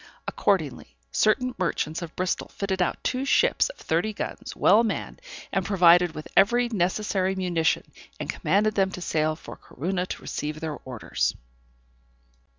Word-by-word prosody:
Accordingly, - - -1 0.2
certain 250 +4 +2
merchants 165 -2 -1
of 170 -2 -7
Bristol 185 0 -1
fitted 190 -2 -3
out 180 - -1
two 255 +1 -1
ships 275 - +3
of - - -10
thirty 175 +7 -1
guns, - - -6
well 210 +5 +5
manned, 225 - -3 0.3
and 195 -1 0
provided 175 -3 +5
with 155 - -7
every 240 +5 +4
necessary 190 -1 0
munition, 175 -3 +1 0.4
and - - -4
commanded 215 +2 +1
them 195 -2 +2
to - - -5
sail 155 -2 0
for - - -10
Corunna 180 +5 -3
to - - -6
receive 150 +1 -4
their 155 -2 -4
orders. 125 -4 -2
185 Hz, 150 wpm, -26 LUFS, 165-210 Hz, 0.4 s, well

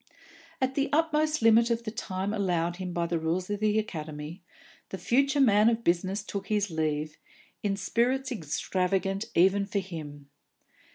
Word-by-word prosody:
At 260 -1 0
the 275 0 0
utmost 310 -2 +1
limit 230 +1 +6
of 235 0 0
the 215 - -4
time 195 -3 -3
allowed 175 -4 0
him 185 -1 -4
by 170 0 -1
the 170 0 -1
rules 175 +4 -2
of 205 - -2
The 215 0 +2
Academy, 155 -5 -5 0.5
the 190 - -5
future 275 +7 +2
man 215 -4 +5
of 235 0 -1
business 185 +3 0
took 195 -1 -5
his 205 -3 0
leave, 155 -1 -2 0.4
in 200 -1 -1
spirits 255 +6 0
extravagant 195 - -1
even 195 +3 +4
for 200 - -2
him. 150 -7 -6
195 Hz, 160 wpm, -28 LUFS, 170-230 Hz, 0.5 s, limit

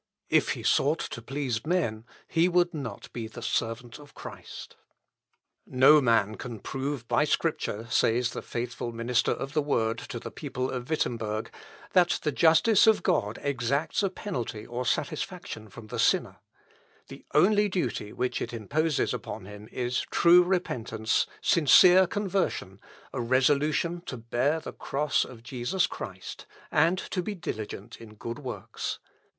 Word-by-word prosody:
If - - +3
he - - -8
sought 150 +4 +3
to 115 - -5
please 125 -2 -3
men, 145 -10 -1 0.2
he 170 +2 +3
would 175 0 +2
not 125 -10 -7
be 115 -2 -4
the 115 +1 -10
servant 115 +2 -2
of 145 -1 -15
Christ. - - -9 0.9
Säuberlich. - - -16
"No 140 +4 +7
man 110 -4 +2
can 120 -3 -6
prove 135 +1 -4
by - - +3
Scripture," 110 +3 -1
says 120 +1 +2
the - - -5
faithful 120 0 -4
minister 115 +1 0
of 135 +2 -4
the 155 - +2
Word 115 -6 0
to - - -7
the - - -8
people 130 +1 -4
of 125 0 -5
Wittemberg, 110 -8 -2 0.4
"that 180 -1 +4
the 150 - +1
justice 180 +9 +5
of 220 - +4
God 105 0 +1
exacts 140 - 0
a 195 - +1
penalty 120 - -5
or 120 +1 -4
satisfaction 110 -1 -3
from 115 +2 -11
the 110 - -6
sinner; - - +2 0.7
the - - -11
only 205 +6 +5
duty 125 - -2
which 125 0 -2
it - - -4
imposes 150 +8 0
upon - - -6
him 105 +2 -11
is 125 0 -2
true 175 +1 +6
repentance, 120 - 0 0.2
sincere 180 +4 +7
conversion, 190 - -2 0.3
a 125 - -2
resolution 145 +7 +2
to 130 - -4
bear 120 +7 0
the - - -8
cross 145 +1 0
of 115 -3 -11
Jesus 125 +9 0
Christ, - - -8 0.2
and 165 +5 +3
to 185 - -3
be 205 +3 -4
diligent 110 - -6
in 110 -2 -12
good 115 +4 -6
works. 130 -4 -5
130 Hz, 155 wpm, -28 LUFS, 115-160 Hz, 0.9 s, No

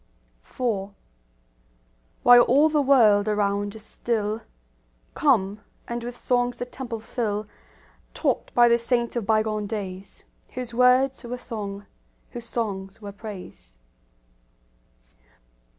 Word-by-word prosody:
IV 200 - -3 1.3
While 245 0 +9
all 290 +5 +5
the 300 -1 +2
world 220 -7 +5
around 205 -1 0
is 220 -1 -7
still, 220 -2 -2 0.7
Come, 210 -8 +2 0.3
and 235 0 -4
with 245 0 -6
songs 245 -1 0
the 245 - -4
temple 245 -2 -6
fill, 215 -2 -3 0.7
Taught - - -1
by 240 0 +7
the 235 0 +4
saints 235 0 0
of 230 -4 -2
bygone 215 -1 +1
days, 195 -3 -6 0.3
Whose 250 -2 -5
words 255 +2 +3
were 245 +1 -5
song, 205 -5 -6 0.5
whose 235 -2 -8
songs 195 -5 -4
were 205 -2 -8
praise. 185 - -9
225 Hz, 115 wpm, -25 LUFS, 205-245 Hz, 1.3 s, While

